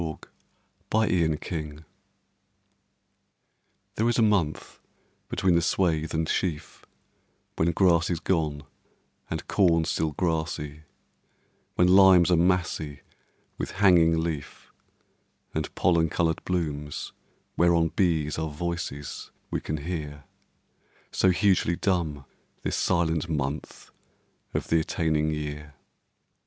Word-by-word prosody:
Michael 80 -2 -4 1.2
Field - - -23
July 75 -2 -5 2.1
THERE 115 +2 +1
is 120 - +1
a 115 - +4
month 95 -8 0 0.5
between 95 -2 +1
the 85 - +3
swath 80 -3 0
and 80 0 0
sheaf 80 -4 -3 0.7
When 80 - +2
grass 85 -1 +3
is 85 -3 -1
gone 75 -6 -1 0.7
And 80 -1 -5
corn 85 -5 +3
still 80 -1 -1
grassy; 80 -3 -2 1.0
When 90 - +4
limes 95 -2 +7
are - - +6
massy 85 -5 0 0.6
With - - -4
hanging 90 -4 +4
leaf, 80 -4 -6 0.8
And 80 -1 -3
pollen 85 -2 +2
coloured 80 +2 0
blooms 75 -5 -3 0.4
whereon 85 -1 +3
Bees 80 -4 0
are 80 0 -2
voices 75 -3 -5 0.2
we - - -2
can 75 - -3
hear, 75 -2 -5 0.9
So 95 - +3
hugely 95 -2 +2
dumb 85 -8 -1 0.4
This - - -1
silent 85 -2 0
month 75 -1 -4 0.6
of - - -2
the 80 - +4
attaining 80 -1 0
year. 75 -1 -5
80 Hz, 110 wpm, -26 LUFS, 75-90 Hz, 2.1 s, limes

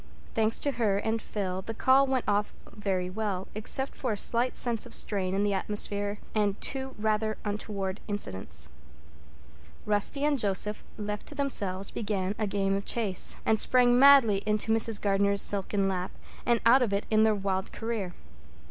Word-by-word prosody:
Thanks 220 0 +1
to 285 - 0
her 210 -5 +1
and 220 +2 -1
Phil, 190 -3 -4
the 225 +4 -7
call 270 +3 +4
really 265 - -1
went 255 - 0
off 205 0 0 0.2
very 190 -4 -2
well, 195 -1 -3
except 265 +6 -1
for 250 - -2
a - - -4
slight 240 +4 +1
sense 235 -3 0
of - - -1
strain 190 -2 +1
in 200 - +1
the 205 -1 +1
atmosphere 205 +1 -2 0.2
and 205 -2 0
two 265 -1 -3
rather 215 0 0
untoward 205 -2 -3
incidents. 95 - -4 1.2
Rusty 210 +7 +1
and 295 -2 +1
Joseph, 210 0 0
left 210 -1 -5
to 295 - -7
themselves, 200 -10 0
began 200 -3 -2
a 215 - 0
game 195 -1 0
of 200 - -3
chase, 205 -6 +1
and 220 -1 +2
sprang 245 0 +4
madly 265 -8 +6
into 215 +1 +1
Mrs. 225 -1 +2
Gardner's 200 0 +3
silken 195 0 0
lap 185 -1 -2 0.4
and 235 -2 +3
out 250 +3 +6
of 225 -5 0
it 200 - -1
in 215 0 +4
their 220 -1 +4
wild 195 -1 -2
career. 225 -4 -3
Mrs. 75 - -18
210 Hz, 175 wpm, -28 LUFS, 195-225 Hz, 1.2 s, madly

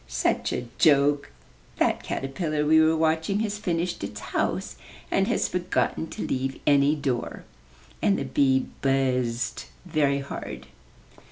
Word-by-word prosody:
"Such 65 0 0
a 125 - -3
joke! 145 -1 +4 0.5
That - - +1
caterpillar 150 +2 -2
we 160 +1 +6
were 160 0 +3
watching 160 +5 +1
has 210 -1 -2
finished 175 - -2
its 105 +1 -5
house, 125 +2 -2 0.3
and - - +2
has - - +1
forgotten - - -1
to - - -5
leave 135 +1 -2
any 145 +1 +4
door," 135 -5 -3 0.6
and 200 - +3
the - - -3
bee 130 -2 +2 0.2
buzzed 130 -3 0 0.2
very 150 -5 +1
hard. 65 - -6
140 Hz, 135 wpm, -26 LUFS, 130-160 Hz, 0.6 s, we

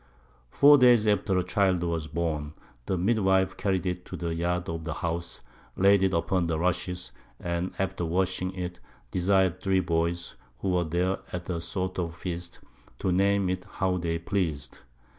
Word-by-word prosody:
Four 145 - +7
Days 120 -4 +6
after 100 -2 +2
a 90 - +2
Child 90 -1 +1
was 85 -2 -2
born, 75 -1 -3 0.3
the 95 - 0
Midwife 95 -1 +2
carried 95 -2 -1
it 90 0 -2
to - - -7
the 85 -1 -2
Yard 90 +1 -1
of 80 -1 -4
the 80 -2 -4
House, 85 0 -3 0.4
laid 100 +1 +5
it 95 -1 +3
upon 85 +1 +1
Rushes, 85 -3 -1 0.3
and 85 +1 -2
after 95 -2 -2
washing 90 +2 0
it, 90 -1 -5 0.3
desir'd 95 -1 +2
3 95 -1 +2
Boys, 85 0 -1 0.2
who 95 - -2
were 90 -1 +1
there 90 +4 0
at 90 0 -5
a 85 -2 -2
sort 90 +2 -3
of 85 -2 -3
Feast, 85 -1 -6 0.4
to 95 - -1
name 100 +1 +2
it 90 0 -2
how 95 -1 0
they 85 -1 -1
pleas'd. 85 -5 -2
90 Hz, 165 wpm, -27 LUFS, 85-95 Hz, 0.4 s, Four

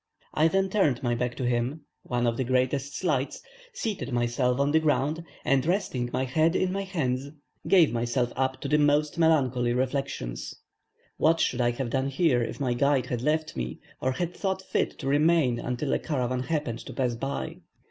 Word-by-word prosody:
I 155 - +4
then 195 +3 +2
turned 155 - +1
my 120 -1 +1
back 120 +1 -1
to 130 - -3
him 120 +5 0 0.2
(one 120 -1 -1
of 115 -1 +1
the 130 - -1
greatest 130 +3 0
slights), 145 -7 -1 0.3
seated 215 - -4
myself 120 +1 +1
on 140 +1 +2
the 160 - +5
ground, 150 +1 0 0.2
and, 135 0 +3
resting 155 -9 -1
my 130 - 0
head 155 +6 +2
in 185 -1 +1
my 195 +1 -1
hands, 140 -9 -2 0.4
gave 175 -9 +5
myself 120 +1 0
up 130 0 -1
to - - -3
the 150 - +3
most 150 +2 +2
melancholy 130 -7 +3
reflections. 125 - -2 0.6
What 165 +1 +3
should 125 - +1
I 120 - +3
have 120 0 -3
done 135 +1 0
here 140 -2 +2
if 115 - -4
my 130 -3 0
guide 135 0 +2
had 125 -2 -3
left 155 +3 0
me, 60 0 -4 0.2
or 130 0 +1
had 175 +5 -3
thought 190 -1 -2
fit - - -1
to 135 - -5
remain 145 -3 +3
until 125 +3 -2
a - - +1
caravan 130 -4 -1
happened 130 -5 -2
to - - -7
pass 125 -3 0
by. 135 +4 -4
135 Hz, 190 wpm, -27 LUFS, 125-155 Hz, 0.6 s, the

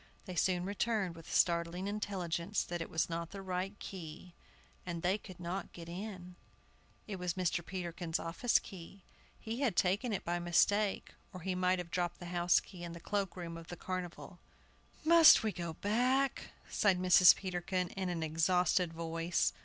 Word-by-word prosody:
They 185 - -6
soon 180 0 +1
returned 205 -2 -1
with 165 0 -12
the - - -6
startling 170 +1 +2
intelligence 195 -2 -2
that 175 -1 -4
it 165 - -5
was 160 - 0
not 170 0 -4
the 195 -1 -8
right 190 +2 -3
key, 175 -2 -9 0.5
and 170 -2 -5
they 190 +4 +2
could 185 -4 -12
not 180 +2 -4
get 170 -1 -9
in. 180 -1 -7 0.7
It 200 -3 -5
was 180 -2 -2
Mr. 180 -2 0
Peterkin's 175 -2 -3
office 170 +9 +1
key; 190 0 -9 0.4
he 225 +2 -5
had 255 -10 +1
taken 200 +8 +1
it 200 - -3
by 175 +1 -1
mistake, 195 +4 +2 0.2
or 185 -2 -9
he 185 +2 -2
might 180 0 +2
have 175 -1 -6
dropped 175 -1 -1
the 175 - -8
house 175 0 +4
key 180 -3 -11
in 170 -1 -6
the 170 - -8
cloak 195 +1 -2
room 170 -2 -6
of 165 0 -10
the 175 - -7
Carnival. 180 -1 -6 0.7
"Must 330 -4 +8
we 220 - +1
go 170 -3 -5
back?" 250 +8 +1 0.2
sighed 195 -3 +2
Mrs. 180 0 +7
Peterkin, 180 -1 -2
in 190 -1 -3
an 170 -2 -2
exhausted 175 +2 +2
voice. 165 +1 0
180 Hz, 175 wpm, -34 LUFS, 170-195 Hz, 0.7 s, Must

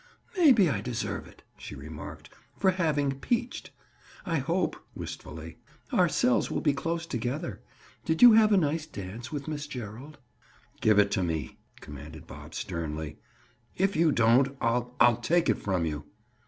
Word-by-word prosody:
"Maybe 265 - +6
I 145 - -1
deserve 125 -2 -4
it," - - -18 0.2
she - - -8
remarked, 75 +2 -9 0.3
"for 190 -1 +3
having 145 -7 0
'peached.' 240 - -2 0.6
I 165 -2 0
hope," 170 +7 0 0.2
wistfully, 80 +1 -8 0.3
"our - - +4
cells - - +2
will - - -1
be 145 - +2
close 165 +4 -2
together. 130 +4 -3 0.4
Did 160 +7 +1
you 240 -2 +11
have 215 -1 +6
a 205 - +6
nice 155 -2 0
dance 110 +2 -7
with 145 -1 -5
Miss 150 -1 -4
Gerald?" 125 +3 -8 0.6
"Give 110 -2 +4
it 105 -1 +4
to - - +1
me," 80 -6 -3 0.2
commanded 75 +1 -10
Bob - - -11
sternly. 80 -2 -4 0.6
"If 195 +2 +1
you 160 -1 +4
don't, 130 +3 +3
I'll—I'll 120 0 +2
take 170 +8 +2
it - - +2
from 95 -4 0
you." 75 -2 -4
135 Hz, 155 wpm, -28 LUFS, 100-165 Hz, 0.6 s, you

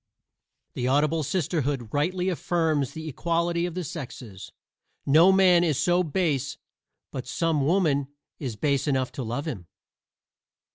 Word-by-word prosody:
The 125 - -2
Audible 150 +4 +2
Sisterhood 145 - -2
rightly 180 +5 0
affirms 160 -6 0
the 160 0 -7
equality 170 +3 0
of 175 - -7
the 180 - -2
sexes: 125 - -8 0.5
no 160 +7 +6
man 185 -2 +5
is 155 -6 +1
so 175 0 +3
base 150 -5 -1 0.5
but 130 -1 -6
some 160 +1 0
woman 150 -4 +2 0.3
is 125 -6 -4
base 140 +4 0
enough 130 -3 0
to 135 - -5
love 120 +6 -3
him. 100 - -5
155 Hz, 135 wpm, -26 LUFS, 135-170 Hz, 0.5 s, no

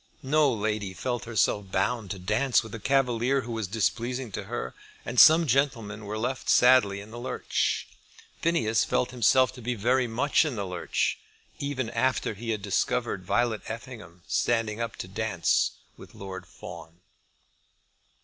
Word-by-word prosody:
No 145 +1 +3
lady 105 -3 -2
felt 120 +1 -3
herself 105 -3 0
bound 100 +2 0
to 100 - -4
dance 110 +8 +1
with 110 - -10
a 115 - -5
cavalier 130 +1 +1
who 120 -1 -7
was 110 -3 -3
displeasing 120 +4 -1
to - - -5
her; - - -4 0.3
and 120 0 0
some 165 +1 +8
gentlemen 115 -6 0
were 105 +1 -4
left 125 +4 -3
sadly 125 -6 +5
in 105 +2 -11
the 120 - -8
lurch. 125 - -1 0.5
Phineas 115 -10 +2
felt 125 - 0
himself 125 +1 +4
to 125 - -11
be 125 +2 -2
very 125 +4 +2
much 125 +8 +2
in 150 -6 -3
the 100 -2 -3
lurch, 90 -2 -1 0.4
even 130 -5 -3
after 125 -1 0
he 115 +3 -7
had 110 -3 -2
discovered - - -1
Violet 120 -3 0
Effingham 110 -7 -9
standing 115 -2 0
up 115 -1 -3
to - - -7
dance - - 0 0.2
with - - -14
Lord 95 -2 -8
Fawn. 80 +3 -11
115 Hz, 160 wpm, -27 LUFS, 105-130 Hz, 0.5 s, some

